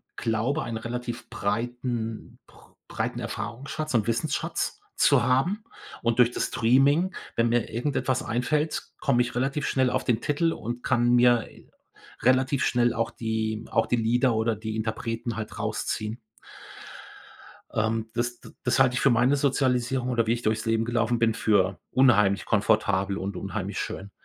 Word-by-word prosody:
glaube, 115 +5 -1
ein 115 -1 -4
relativ 120 +1 -5
breiten 115 +1 -3
br - - -21
breiten - - -3
Erfahrungsschatz 140 +5 -5
und 115 -2 +2
Wissensschatz 125 +6 -1 0.2
zu - - +4
haben 175 - +1 0.4
und 115 -1 0
durch 120 0 +6
das - - -1
Streaming, 140 +10 +3 0.2
wenn 115 0 +2
mir 120 0 +1
irgendetwas 130 +2 -1
einfällt, 150 +7 -1 0.2
komme 125 -4 +2
ich 120 -1 -2
relativ 135 +3 -1
schnell 130 -2 +2
auf - - 0
den 120 -2 +1
Titel 165 +3 +1
und 120 +2 -6
kann 120 0 +2
mir 120 -2 +4 0.7
relativ 130 +2 +3
schnell 120 -1 +2
auch 115 -1 -1
die 110 -1 -3
auch 110 -1 +2
die 120 - +2
Lieder 120 +1 +2
oder 110 0 +1
die 110 +1 -5
Interpreten 115 +1 -3
halt 110 -1 -6
rausziehen. 110 +2 -3 1.5
Ähm, 110 0 0
das 120 0 -2
d - - -13
das 125 +2 +1
halte 130 -1 +5
ich - - 0
für 135 - +5
meine 120 +4 +3
Sozialisierung 130 -2 +1
oder 120 -2 +1
wie 115 - +3
ich 120 - -3
durchs 110 0 0
Leben 115 0 +1
gelaufen 120 0 0
bin, 115 -1 +3
für 100 -4 +1
unheimlich 105 -7 +4
komfortabel 100 -2 +1
und 100 +1 -4
unheimlich 100 +1 -4
schön. 100 +1 -5
120 Hz, 155 wpm, -26 LUFS, 110-125 Hz, 1.5 s, durch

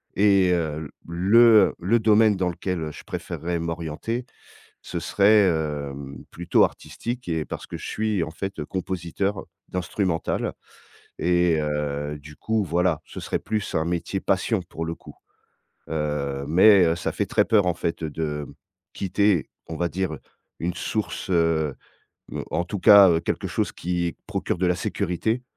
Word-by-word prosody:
et, 100 -2 +4
heu, 80 -2 -1
l - - -9 0.2
le 95 +7 +4 0.3
heu, - - -8
le 100 +7 +2
domaine 110 -1 +4
dans 90 -1 0
lequel 85 -3 -3
je - - -11
préférerais 85 +1 -4
m'orienter. 85 +8 -3 0.6
Ce - - -5
serait, 105 +1 +4
hem, 70 -4 -3
plutôt 85 +1 +3
artistique 120 -4 -5
et 80 -2 -1
parce - - -6
que - - -6
je - - -7
suis 110 -4 -1
en 80 - -3
fait 95 -1 -5
compositeur 95 +2 -3 0.2
d'instrumental 90 -1 -1 0.7
et 85 -1 +2
heu, 75 0 -2
du 75 +1 -13
coup 110 +5 0
voilà, 85 -2 +1
ce - - -9
serait - - -2
plus 105 -2 -3
un 80 - +1
métier 90 +3 -2
passion 95 +2 +1
pour 80 - -5
le 80 - -3
coup. - - -14 0.8
Heu, 75 -3 -2
mais, 95 +5 +7
heu, 80 0 +2
ça 85 - -2
fait - - -1
très - - +2
peur 105 -4 +3
en 90 - +2
fait 85 0 -3
de, 75 -1 -3 0.5
quitter, 100 -2 +1 0.2
on 80 - -4
va 85 - 0
dire 85 -1 -2 0.4
une 85 +1 -1
source, 105 +2 -3
heu 80 -4 +2 0.6
heu, - - -4
en 85 +3 0
tout 95 +2 -5
cas 100 -1 +8
heu, 80 - +3
quelque 85 - -2
chose - - -1
qui 85 0 -2
procure - - -2
de 90 - 0
la 90 - +2
sécurité 100 +7 -1
85 Hz, 160 wpm, -24 LUFS, 80-95 Hz, 0.8 s, cas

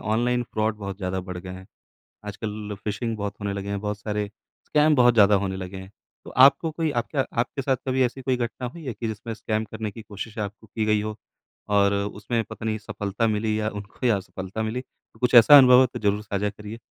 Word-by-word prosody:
Online 120 +3 +1
fraud 110 0 0
बहुत 100 -2 -6
ज़्यादा 95 -1 -3
बढ़ 90 - -5
गए 90 +1 -8
हैं। 95 +1 -9 0.6
आजकल 105 0 -5
फिशिंग 110 +2 -2
बहुत 100 0 -3
होने 100 -1 -2
लगे 100 0 -5
हैं, 100 -1 -2
बहुत 105 -1 -3
सारे 105 -2 -2 0.4
स्कैम 150 0 +3
बहुत 120 -1 +5
ज़्यादा 105 -2 +6
होने 95 0 -3
लगे 95 0 -6
हैं। 95 +1 -10 0.3
तो - - -8 0.2
आपको 160 +3 +3
कोई 160 -1 -1
आपका 135 +1 -2 0.2
आपके 135 +2 -4
साथ 135 0 +1
कभी 130 0 +1
ऐसी 125 +2 -2
कोई 130 -1 0
घटना 120 +1 -3
हुई 160 +4 -10
है 125 - -3
कि 115 - -4
जिसमें 110 +2 -5
स्कैम 110 0 -2
करने 110 -1 -4
की 115 - -10
कोशिश 105 +1 -8
आपको 105 +1 -6
की 110 +1 -2
गई 105 -1 +2
हो 110 0 -4 0.5
और 100 -1 +4
उसमें 105 +3 -2
पता 110 - -9
नहीं, 110 -1 0
सफलता 105 +1 -2
मिली 110 0 0
या 105 0 0
उनको 105 +4 -7
या 115 - +4
असफलता 95 +3 -6
मिली? 110 +4 -2
तो 115 -3 -27
कुछ 125 0 +2
ऐसा 120 +5 +10
अनुभव 125 -2 +8
हो, 130 - +6
तो 125 - -6
ज़रूर 105 0 +1
साझा 100 0 -1
करिए। 105 +1 -9
110 Hz, 225 wpm, -25 LUFS, 100-120 Hz, 0.6 s, ऐसा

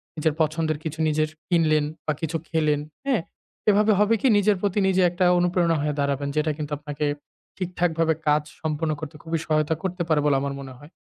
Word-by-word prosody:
নিজের 155 -1 +1
পছন্দের 155 0 0
কিছু 160 0 -5
নিজের 155 0 +1 0.2
কিনলেন 155 -4 +3 0.2
বা 155 - +1
কিছু 165 0 -1
খেলেন, 155 -3 +1 0.3
হ্যাঁ? 265 -8 +2 0.5
এভাবে 210 +1 +4
হবে 210 +2 +4
কি - - +3
নিজের 205 0 +3
প্রতি 205 0 +1
নিজে 190 0 +3
একটা 180 +1 0
অনুপ্রেরণা 175 -1 +2
হয়ে 150 0 0
দাঁড়াবেন 140 0 0
যেটা 155 +1 +1
কিন্তু 150 -1 -5
আপনাকে 150 0 -4 0.5
ঠিকঠাকভাবে 170 -3 0
কাজ 150 0 +3 0.2
সম্পন্ন 155 0 -1
করতে 155 +1 -7
খুবই 165 0 -2
সহায়তা 155 0 +1
করতে 185 -1 -3
পারে 155 -2 +3
বলে 145 -2 +4
আমার 140 0 -2
মনে 135 -1 -8
হয়। 145 +3 -14
160 Hz, 185 wpm, -24 LUFS, 150-175 Hz, 0.5 s, এভাবে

